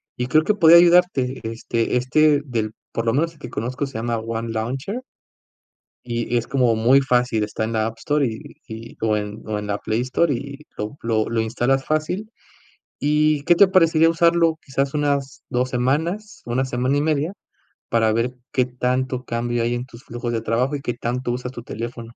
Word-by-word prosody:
y 125 0 -2
creo 155 +5 +4
que 210 - +2
podría 170 -4 +7
ayudarte, 170 -7 +4
este 115 +1 -1
este, 145 +4 +3
del 110 -5 -2 0.2
por 115 0 -3
lo 115 - +3
menos 165 +5 0
el 155 - -23
que - - -8
conozco 130 +5 -3
se 135 - -14
llama 115 +1 -1
One 115 +1 -4
Launcher 135 - -3 1.0
y 120 0 -1
es 120 - -2
como 125 -3 +2
muy 125 +5 +4
fácil, 125 -4 +1
está 105 +1 -3
en 110 +1 -2
la 110 -1 +1
App 115 - -6
Store, 145 +4 +1
y 110 -3 -4 0.3
y, 115 +1 -9
o 110 -1 +2
en 105 +1 -5
o 105 -1 -2
en 105 - -6
la 100 0 -1
Play 110 +3 -1
Store, 140 +5 +1
y 140 +3 -6 0.2
lo 105 +7 -5
lo 110 -2 +1
lo 115 -1 0
instalas 120 +4 0
fácil. 180 +8 -2 0.7
¿Y 150 0 +2
qué 175 - +5
te 200 - +7
parecería 165 -3 +4
usarlo 165 -1 +3
quizás 135 +1 -2
unas 140 -2 -1
2 125 +1 -1
semanas, 160 - -1
1 125 +3 0
semana 130 +2 0
y - - +2
1/2. 155 +2 0 0.6
para 110 -1 +3
ver 115 +3 0 0.2
qué 125 -1 +2
tanto 125 +1 -2
cambio 120 0 -2
hay 120 +1 0
en 120 +1 -4
tus 120 -1 -15
flujos 120 0 -5
de 115 - -1
trabajo, 125 +6 0
y 140 - -5
qué 120 - -2
tanto 120 +1 -2
usas 125 +1 -4
tu 120 - -8
teléfono? 115 +1 -6
125 Hz, 200 wpm, -22 LUFS, 115-145 Hz, 1.0 s, podría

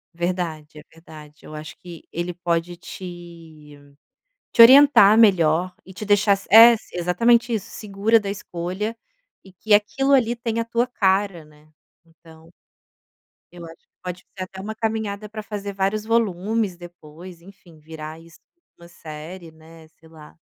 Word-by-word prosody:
Verdade. 170 -4 -4
É - - -14
verdade. 155 -2 -15
Eu 155 - -10
acho 150 0 -9
que 175 -3 -12
ele 175 +1 -4
pode 175 0 -3
te 170 -5 -12 0.7
te - - 0
orientar 255 -4 +7
melhor 180 -5 +3
e 190 - -13
te 200 - -7
deixar 205 0 +3
s 195 - -3
é, 230 +2 +9 0.2
exatamente 230 +8 +1
isso. 215 - -5
Segura 210 +2 0
da 205 -2 -6
escolha 195 +3 -5 0.5
e 190 - -17
que 210 +4 -3
aquilo 240 +7 +2
ali 240 -4 +3
tem 230 -1 -4
a 230 - -1
tua 235 +2 -1
cara, 195 -6 0
né. 150 0 -22 0.4
Então 165 0 -20 1.0
eu 175 -1 -11
acho 165 - -15
que - - -78
pode 180 -1 -6 0.2
ser 190 - -5
até 190 0 -13
uma 210 +3 -6
caminhada 215 -2 -4
pra 215 0 -8
fazer 205 -1 -6
vários 195 +2 -2
volumes, 220 -2 -1
depois, 175 0 -13
enfim, 175 -3 -18
virar 155 0 -10
isso 165 0 -18 0.4
uma 170 - -14
série, 165 +1 -11
né, 160 0 -17
sei 160 - -20
lá. 155 -2 -16
180 Hz, 155 wpm, -22 LUFS, 165-210 Hz, 1.0 s, é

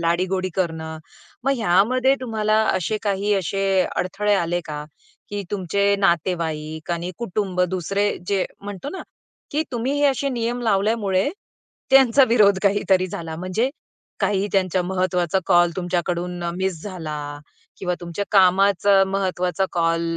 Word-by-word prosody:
लाडीगोडी 185 +3 0
करणं. 160 -3 -3 0.5
मग 275 - +3
ह्यामध्ये 235 +6 +3
तुम्हाला 215 -3 0 0.2
असे 185 +3 -1
काही 205 0 0
असे, 195 +1 -1 0.3
अडथळे 205 +3 0
आले 175 -1 0
का? 150 -1 -6 0.5
की 205 0 -3
तुमचे 200 +1 +1
नातेवाईक 160 -3 -1
आणि 170 +1 -2
कुटुंब 195 -4 -2
दुसरे 195 +3 0 0.2
जे 195 -1 +1 0.2
म्हणतो 205 +5 -7
ना, 380 - -6 0.5
की 300 +2 0
तुम्ही 245 +3 -1
हे - - +3
असे 275 +1 +1
नियम 240 -1 -2
लावल्यामुळे 200 -1 +1 0.6
त्यांचा 270 0 +6
विरोध 205 -4 +5
काहीतरी 195 -2 +2
झाला 165 -2 -6
म्हणजे 185 +9 -1 0.5
काही 200 -1 +1
त्यांच्या 185 -2 +1
महत्त्वाचा 180 -1 0
कॉल 175 -2 +5
तुमच्याकडून 175 0 -2
मिस 185 -4 -2
झाला 165 -7 -5 0.6
किंवा 180 -2 -1
तुमच्या 175 +3 -4
कामाचा 195 0 +5
महत्त्वाचा 190 -2 -1
कॉल 165 -1 +1
190 Hz, 130 wpm, -22 LUFS, 175-205 Hz, 0.6 s, त्यांचा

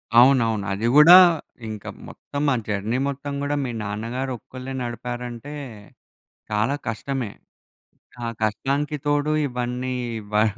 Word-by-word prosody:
అవునవును. 115 -4 +5
అది 105 +4 -1
గూడా 155 +4 +10 0.5
ఇంక 110 -2 -7 0.2
మొత్తం 145 0 -5
ఆ - - +2
జర్నీ 105 +3 -1
మొత్తం 140 +1 -4
కూడా 145 +1 0
మీ 125 - -3
నాన్నగారు 115 +6 -3
ఒక్కళ్ళే 130 +3 -8
నడిపారంటే 120 +3 -5 1.0
చాలా 105 +6 +1
కష్టమే. 120 0 -3 1.0
ఆ - - -1 0.2
కష్టానికి 140 +7 0
తోడు 145 +1 +1 0.2
ఇవన్నీ 125 0 -3 0.4
వ 105 +1 +5
125 Hz, 115 wpm, -23 LUFS, 110-140 Hz, 1.0 s, గూడా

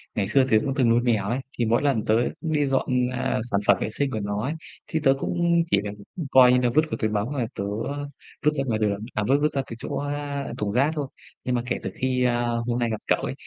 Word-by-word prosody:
Ngày 100 -2 0
xưa 135 +5 +4
tớ 110 - +5
cũng 135 - 0
từng 130 -4 +3
nuôi 120 +1 +4
mèo 115 -5 +1
ấy, 125 +3 0 0.2
thì 120 - +1
mỗi 115 +2 +2
lần 135 -7 +1
tớ 110 - +3 0.3
đi 155 -3 +1
dọn, 135 -1 0 0.2
à, 125 - -1
sản 100 - +2
phẩm 100 - +6
vệ - - -1
sinh 140 +4 -1
của 110 - -2
nó 100 0 -2
ấy, 145 +4 -1 0.3
thì 160 - -1
tớ 135 - +5
cũng, - - -3
ừm, 170 0 +3
chỉ 165 - +2
việc, 105 - -3 0.3
ư, 170 - -2
coi 125 -1 +7
như - - +5
là 125 - +2
vứt 155 - +7
vào - - -1
túi 110 - 0
bóng 105 +3 -1
rồi 125 -5 -1
tớ, - - -3 0.2
ơ, 145 0 -4 0.4
vứt 150 - +5
ra 135 - -1
ngoài 110 -2 0
đường, 105 -2 0
à, 105 - 0
vứt 135 +2 +4
vứt 150 0 +1
ra 135 - 0
cái 115 - -7
chỗ, - - -5
a, 145 -1 -3
thùng 105 -1 -2
rác 135 +6 +2
thôi. 145 -3 -2 0.4
Nhưng 125 -1 0
mà 120 - +1
kể 125 - -1
từ - - -3
khi, 130 -1 0
a, 120 -1 +2 0.2
hôm 120 0 0
nay 120 -1 +1
gặp 110 - -2
cậu - - +3
ấy, - - -2
125 Hz, 285 wpm, -25 LUFS, 110-140 Hz, 0.4 s, coi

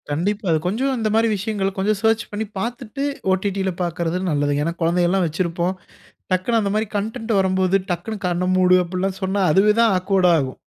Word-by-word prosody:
கண்டிப்பா, 195 +8 -1
அது 160 - +3
கொஞ்சம் 250 +9 0
இந்தமாரி 220 0 +2
விஷயங்கள 205 -1 -1
கொஞ்சம் 205 +2 +1
சர்ச் 225 0 +2
பண்ணி 210 +1 -3
பார்த்துட்டு, 245 +4 -4 0.3
ஓடிடி 195 +1 0
ல - - +1
பார்க்கிறது 170 0 -1
நல்லதுங்க. 145 0 0
ஏன்னா, 165 - -1
குழந்தைகள்லாம் 175 +2 +2
வச்சிருப்போம். 170 +3 -1 0.6
டக்குன்னு 210 +6 +1
அந்தமாரி 210 +2 0
கன்டன்ட் 225 +3 -4
வரும்போது 190 0 +1 0.2
டக்குன்னு 195 +4 -4
கண்ண 175 0 -1
மூடு 185 0 +5
அப்புட்லாம் 185 +2 -3
சொன்னா, 195 +1 0
அதுவே 200 +6 +4
தான் 225 -3 +4
ஆக்வேர்டா 185 -1 +2
ஆகும். 130 -2 -4
190 Hz, 160 wpm, -21 LUFS, 175-215 Hz, 0.6 s, மூடு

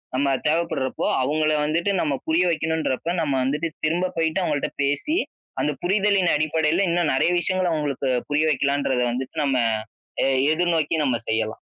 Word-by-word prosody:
நம்ம 140 +2 +1 0.2
தேவப்படுறப்போ, 160 -4 -1 0.2
அவுங்கள 155 +3 +1
வந்துட்டு 170 +6 0
நம்ம 150 -3 0
புரிய 165 +3 +3
வைக்கணுன்றப்ப 160 -2 -1
நம்ம 145 -4 0
வந்துட்டு 150 +5 -1 0.2
திரும்ப 170 +4 +1
போயி்ட்டு, 165 +3 +1
அவுங்கள்ட்ட 150 -4 -1
பேசி, 145 - 0 0.4
அந்த 150 - +1
புரிதலின் 195 0 +2
அடிப்படையில 160 +4 +1
இன்னும் 170 -2 +1
நெறய 135 +6 +2
விஷயங்கள 185 0 0
அவுங்களுக்கு, 145 -3 -2 0.2
புரிய 150 +2 +2
வெக்கலான்ன்றத 140 -2 0
வந்துட்டு 130 +4 -5
நம்ம, 135 -2 +1 0.7
எ - - +3 0.3
எதிர்நோக்கி 165 -2 +1
நம்ம 125 -4 +1
செய்யலாம். 110 0 -1
155 Hz, 145 wpm, -23 LUFS, 140-170 Hz, 0.7 s, புரிய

